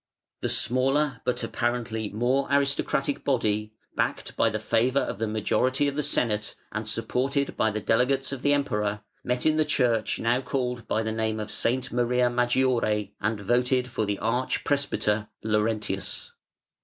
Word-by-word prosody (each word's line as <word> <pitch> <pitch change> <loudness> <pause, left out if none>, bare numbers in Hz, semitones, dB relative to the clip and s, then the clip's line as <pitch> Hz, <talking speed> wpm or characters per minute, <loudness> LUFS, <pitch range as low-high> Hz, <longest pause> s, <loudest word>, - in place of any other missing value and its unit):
The - - -1
smaller 135 +1 +1
but 125 - 0
apparently 115 -3 -2
more 125 +5 +1
aristocratic 140 0 +1
body, 110 -5 0 0.2
backed - - -1
by - - +3
the 110 - -2
favour 115 +5 +2
of - - -4
the 110 - 0
majority 130 +6 +1
of 140 - -2
the 150 - +1
Senate 110 -7 0 0.2
and 110 +1 -4
supported 135 +5 0
by 110 - +2
the 105 0 -3
delegates 130 +6 +2
of 135 -2 -5
the 145 - +2
Emperor, 105 -7 0 0.2
met 125 0 -1
in 155 0 +3
the 155 - +4
church 125 -7 +1
now 120 +3 +1
called 125 -2 -3
by 110 - 0
the 110 - -2
name 110 0 -1
of 105 0 -4
S. 125 +2 0
Maria 125 0 +2
Maggiore 120 -4 +1
and 105 +1 0
voted 125 +4 +1
for 110 -2 -1
the 100 -1 -1
arch 125 +5 -1
presbyter 110 -7 0 0.2
Laurentius. 105 -2 -1
120 Hz, 160 wpm, -26 LUFS, 110-130 Hz, 0.2 s, the